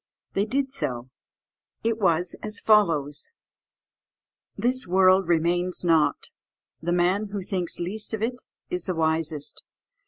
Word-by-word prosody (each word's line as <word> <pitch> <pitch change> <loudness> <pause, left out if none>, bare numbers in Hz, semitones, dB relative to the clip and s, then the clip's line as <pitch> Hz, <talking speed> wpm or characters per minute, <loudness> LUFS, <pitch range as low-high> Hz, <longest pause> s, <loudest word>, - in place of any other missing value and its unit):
They 200 - +1
did 270 +4 -1
so: 125 - -4 0.7
it 225 0 0
was 175 -3 +1
as 215 0 -4
follows: 165 - +2 1.2
"This 255 -1 +1
world 185 +1 +5
remains 175 +2 +1
not; 165 -3 +2 0.5
the 170 +2 -1
man 180 +4 +2
who 200 -1 -5
thinks 180 -3 -2
least 210 +6 -3
of 220 - -4
it 245 +2 -2 0.3
is 180 -1 -2
the 185 - -1
wisest. 160 -2 -1
180 Hz, 125 wpm, -25 LUFS, 165-215 Hz, 1.2 s, world